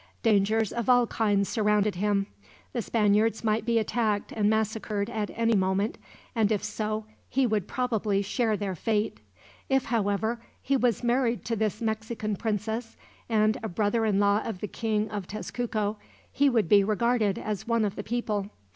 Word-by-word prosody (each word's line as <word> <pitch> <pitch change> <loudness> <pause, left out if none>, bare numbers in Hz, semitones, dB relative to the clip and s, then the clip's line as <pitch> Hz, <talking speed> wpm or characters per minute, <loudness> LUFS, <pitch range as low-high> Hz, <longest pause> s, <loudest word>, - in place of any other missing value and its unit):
Dangers 215 -1 +2
of 235 +1 -2
all 245 -1 +6
kinds 205 -3 +1
surrounded 210 -1 +2
him. 200 +2 +1 0.5
The 240 - -1
Spaniards 215 +1 +2
might 220 0 +1
be 235 -1 +3
attacked 220 -2 0
and 210 -2 +1
massacred 220 -1 -1
at 215 -3 -2
any 230 0 +2
moment, 190 +2 0 0.3
and 220 -3 +2
if 210 -2 0
so, 215 0 -3 0.2
he 270 0 +2
would 215 -5 0
probably 220 -5 0
share 220 +1 0
their 200 -2 -2
fate. 210 +4 -1 0.5
If, 270 -1 +2
however, 220 +1 0 0.2
he 275 - 0
was 245 -4 +1
married 240 0 +1
to 230 - -1
this 215 0 -1
Mexican 220 -1 -2
princess, 220 +2 -3 0.3
and 215 -1 +2
a 220 - -3
brother 210 +4 +1
in 205 -3 +2
law 205 +1 +3
of 220 -5 -5
the 210 - -3
King 215 0 -1
of 205 -3 -4
Tezcuco, 215 0 -3 0.3
he 285 0 +3
would 225 -8 +2
be 200 +3 +6
regarded 215 0 +1
as 215 0 -4
one 230 -2 +2
of 200 - -2
the - - -4
people. 210 -3 -2
215 Hz, 170 wpm, -27 LUFS, 205-230 Hz, 0.5 s, all